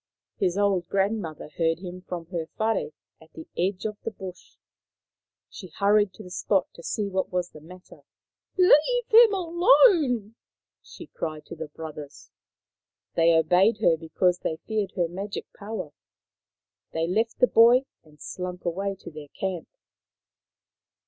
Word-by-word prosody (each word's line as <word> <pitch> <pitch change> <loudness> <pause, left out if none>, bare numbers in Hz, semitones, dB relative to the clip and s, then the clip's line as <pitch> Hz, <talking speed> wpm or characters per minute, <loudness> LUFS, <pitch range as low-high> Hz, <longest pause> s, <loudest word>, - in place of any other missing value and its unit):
His 185 -1 0
old 195 -4 +1
grandmother 195 -5 -1
heard 165 -1 +2
him 180 0 -8
from 175 -2 -6
her 165 -3 -3
whare 220 -5 0 0.3
at 160 - -19
the 160 - -10
edge 185 +3 -1
of 210 -1 -4
the - - -3
bush. 190 -4 -11 0.9
She 185 - -10
hurried 205 +3 +2
to 215 - -11
the 180 - -12
spot 185 +1 +1
to - - -12
see 205 +4 -2
what 190 -1 -2
was 180 -1 -2
the 155 - -13
matter. 180 +3 -15 0.4
" - - -48
Leave 375 +7 +4
him 455 0 +8
alone! 345 - +3 0.2
" - - -68
she - - -12
called 155 -2 -6
to - - -9
the 160 -1 -6
brothers. 150 -1 -10 0.8
They 165 0 +4
obeyed 180 +7 +3
her 170 -6 +4
because 175 +2 0
they 160 - -3
feared 215 -3 -2
her 175 -2 +1
magic 195 +4 -6
power. 210 -7 -6 1.0
They 165 0 0
left 220 +6 -1
the 250 - +5
boy 245 +3 +5 0.2
and 150 -1 -22
slunk 180 -1 -6
away 195 +3 -2
to - - -9
their 150 -1 -10
camp. 185 +2 -5
185 Hz, 155 wpm, -26 LUFS, 170-215 Hz, 1.0 s, him